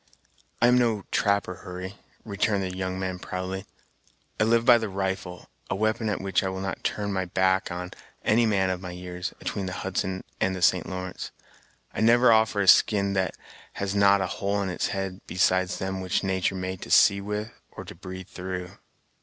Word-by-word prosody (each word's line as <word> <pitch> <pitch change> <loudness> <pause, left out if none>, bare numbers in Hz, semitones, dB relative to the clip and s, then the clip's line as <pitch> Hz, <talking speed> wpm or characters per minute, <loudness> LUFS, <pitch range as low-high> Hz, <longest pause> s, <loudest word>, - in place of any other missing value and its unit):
"I - - +8
am 125 +1 +5
no 115 -5 +1
trapper, 100 -3 +1
Hurry," 90 +1 -7 0.3
returned 100 -1 0
the 90 -1 -4
young 95 0 -3
man 95 -1 -3
proudly: 95 +2 -5 0.7
"I 110 - +4
live 115 +1 +3
by 120 -2 +7
the 110 -2 -3
rifle, 95 -2 -4 0.2
a 95 - 0
we'pon 110 +2 0
at 105 - -1
which 95 -1 +1
I 95 - 0
will 95 0 -4
not 95 0 -4
turn 100 -1 -1
my 95 -1 -1
back 95 +1 +1
on 90 0 -5 0.3
any 115 +2 +4
man 95 -3 +2
of 90 -1 -3
my 90 - -6
years, 90 +1 -5
atween 100 -2 -3
the 95 - -4
Hudson 95 0 -2 0.2
and 95 0 +1
the 95 - -6
St. - - +3
Lawrence. 95 0 -5 0.6
I - - -3
never 120 +2 +6
offer 110 -2 +3
a 100 - 0
skin 100 0 +5
that 95 -1 -1 0.4
has 100 -1 -3
not 100 -1 +5
a - - +1
hole 100 +2 -1
in 95 - -2
its 90 - -1
head 95 -1 -4
besides 90 +2 +2
them 95 -1 -3
which 90 +1 0
natur' 95 0 0
made 95 0 -4
to - - -8
see 100 0 +6
with 105 +3 -4 0.2
or - - -9
to - - -9
breathe 95 0 -9
through." 90 -1 -5
95 Hz, 195 wpm, -26 LUFS, 95-100 Hz, 0.7 s, I